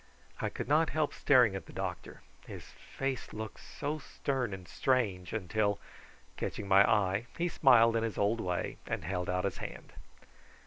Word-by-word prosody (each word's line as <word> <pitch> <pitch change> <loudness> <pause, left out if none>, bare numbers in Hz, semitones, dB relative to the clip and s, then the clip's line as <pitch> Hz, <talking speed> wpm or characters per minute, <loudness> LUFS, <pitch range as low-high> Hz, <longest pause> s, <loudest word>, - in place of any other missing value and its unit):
I - - -1
could - - -5
not 155 +2 +3
help 155 -2 0
staring 125 -7 +4
at 95 - -6
the - - -11
doctor: - - -5 0.2
his - - -8
face 135 -2 -5
looked 110 0 -6
so 150 +1 -4
stern 135 -4 -2
and 95 -2 -7
strange 105 -7 0 0.2
till, 105 -1 +1 0.6
catching 100 - -4
my 100 0 +7
eye, 105 0 +2
he 175 - +1
smiled 120 -8 +5
in 115 - +2
his 115 -4 -3
old 105 +3 +1
way, 90 -1 -2
and - - -3
held 90 +1 -2
out 90 +1 0
his 100 - -2
hand. - - -8
110 Hz, 170 wpm, -32 LUFS, 95-130 Hz, 0.6 s, my